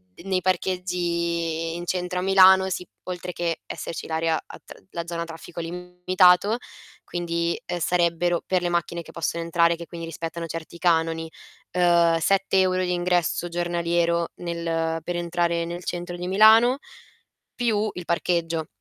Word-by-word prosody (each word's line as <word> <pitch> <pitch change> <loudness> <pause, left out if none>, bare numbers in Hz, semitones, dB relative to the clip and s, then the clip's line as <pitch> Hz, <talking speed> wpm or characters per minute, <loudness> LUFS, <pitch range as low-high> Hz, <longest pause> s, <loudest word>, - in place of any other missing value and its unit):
d - - -14
nei 190 -1 0
parcheggi 170 -3 -1
in 175 0 -5
centro 180 0 -1
a - - -1
Milano, 190 0 +6
si, 180 -1 -4 0.2
oltre 180 0 -5
che 170 -1 -2
esserci 165 - -6
l'area 160 0 0
a - - -12
tr - - -14
la 170 - -4
zona 170 -1 -3
traffico 165 +1 -9
limitato, 180 +4 +2 0.5
quindi, 170 -1 -2
ehm, 175 - -3
sarebbero 175 0 +1
per 185 -1 +1
le 175 - -1
macchine 170 0 -1
che - - -13
possono 170 0 -2
entrare 170 0 +3
che 170 0 -8
quindi 170 -1 -7
rispettano 165 +1 -5
certi 165 +1 -7
canoni, 165 -1 +1 0.4
ehm, 170 -2 +4
7 195 +3 +2
euro 185 0 +2
di 180 0 0
ingresso 175 -1 0
giornaliero 170 -1 0
nel 165 -1 -2
per 175 +1 -3
entrare 170 -1 0
nel 175 +1 -6
centro 175 0 -4
di 180 0 -5
Milano, 220 +6 +6 0.8
più 220 -3 +1
il 180 - -7
parcheggio. 170 -2 0
175 Hz, 155 wpm, -24 LUFS, 170-180 Hz, 0.8 s, Milano